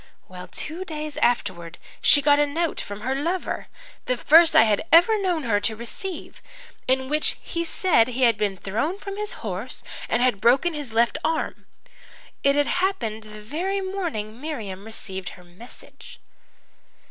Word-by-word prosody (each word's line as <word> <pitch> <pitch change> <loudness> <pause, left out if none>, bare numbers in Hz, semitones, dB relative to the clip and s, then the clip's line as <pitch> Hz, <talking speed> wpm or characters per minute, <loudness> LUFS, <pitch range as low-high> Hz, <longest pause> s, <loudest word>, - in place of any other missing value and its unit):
"Well, 180 -1 -10
two 330 +5 -5
days 305 -4 -6
afterwards 175 -8 0 0.2
she 285 - +5
got 290 0 +5
a 295 - +3
note 325 +3 -1
from 205 +1 -7
her 260 +4 -1
lover 335 +7 -2 0.4
the 250 - 0
first 325 +6 +6
I - - +9
had 215 -2 +2
ever 400 +6 +6
known 355 -5 0
her 215 -5 +2
to 220 +2 0
receive 305 - -7 0.5
in 260 0 +1
which 300 +2 +1
he 335 - -4
said 335 -7 +3
he 255 +1 -2
had 230 -3 +5
been 205 -2 -1
thrown 225 - -2
from 395 -1 -7
his 420 0 -4
horse 205 +5 -5 0.3
and 240 - +2
had 245 -6 +2
broken 270 +9 +4
his 290 -6 -5
left 235 +6 +2
arm. 320 - -2 0.7
It 280 0 +3
had 290 0 +3 0.2
happened 225 - -1
the 215 0 -11
very 355 - -2
morning 330 - -4
Miriam 215 -11 -5
received 190 -5 -6
her 180 - -15
message. 180 +8 -14
260 Hz, 165 wpm, -24 LUFS, 215-330 Hz, 0.7 s, I